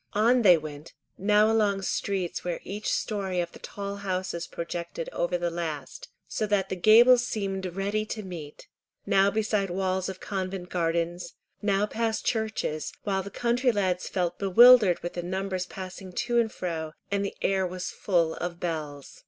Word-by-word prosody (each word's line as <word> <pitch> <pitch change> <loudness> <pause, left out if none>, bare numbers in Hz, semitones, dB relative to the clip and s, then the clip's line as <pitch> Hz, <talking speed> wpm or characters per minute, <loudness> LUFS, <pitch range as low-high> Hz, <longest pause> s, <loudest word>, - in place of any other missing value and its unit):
On 235 +4 +4
they 180 -6 +7
went, 150 0 -9 0.3
now 210 +2 +4
along 205 -3 +2
streets 190 -2 -2
where 175 -1 -3
each 205 +3 -3
story 195 -4 -1
of 170 -1 -2
the - - -13
tall 200 0 -6
houses 185 -3 -3
projected 170 0 -5
over 175 +1 0
the 175 -1 -2
last, 160 -5 -5 0.2
so 215 - -2
that 200 -2 +1
the - - -2
gables 235 +6 +7
seemed 195 -6 -3
ready 200 +2 -1
to 215 -1 -5
meet; 165 -6 -9 0.4
now 195 +1 +4
beside 210 -2 0
walls 185 +1 -1
of 190 -1 -7
convent 185 -2 -4
gardens, 170 0 -1 0.3
now 205 0 +2
past 225 +1 -2
churches, 220 -9 -1
while 195 -2 0
the 195 - -7
country 245 +4 +1
lads 185 -4 -1
felt 180 -2 -1
bewildered 205 -1 +7
with 175 - -4
the 175 - -3
numbers 185 +1 -3
passing 185 0 -8
to 240 +1 +1
and 225 -2 +1
fro, 160 -3 -4 0.2
and 200 0 +1
the 200 - -4
air 190 -1 +2
was 185 +1 -5
full 170 -5 +1
of 175 0 -4
bells. 150 -5 -5
190 Hz, 170 wpm, -27 LUFS, 175-210 Hz, 0.4 s, they